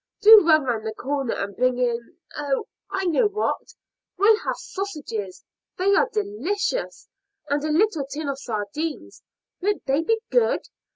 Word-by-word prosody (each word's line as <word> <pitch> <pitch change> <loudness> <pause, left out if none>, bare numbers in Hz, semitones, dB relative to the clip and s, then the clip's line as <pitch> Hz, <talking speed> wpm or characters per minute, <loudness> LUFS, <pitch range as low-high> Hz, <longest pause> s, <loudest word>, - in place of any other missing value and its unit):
Do 430 -4 +9
run 310 -2 +6
round 235 -4 -1
the 220 - -4
corner 275 -1 -2
and 200 0 -4
bring 255 +2 +1
in 240 +2 -2 0.2
Oh! 285 -2 -1 0.2
I 385 -1 -2
know 365 +6 +3
what. 425 +3 -3 0.4
We'll 420 +3 +5
have - - -2
sausages 290 - -6 0.3
they 390 +2 +2
are 465 +4 +3
delicious 410 +2 -2 0.4
and 285 0 0
a 310 - -1
little 320 -3 +1
tin 295 +2 -5
of 275 -1 -3
sardines 245 +8 -4 0.4
won't 410 +2 -1
they 275 +3 +2
be 445 +7 +1
good? 485 -2 +2
310 Hz, 155 wpm, -24 LUFS, 265-410 Hz, 0.4 s, Do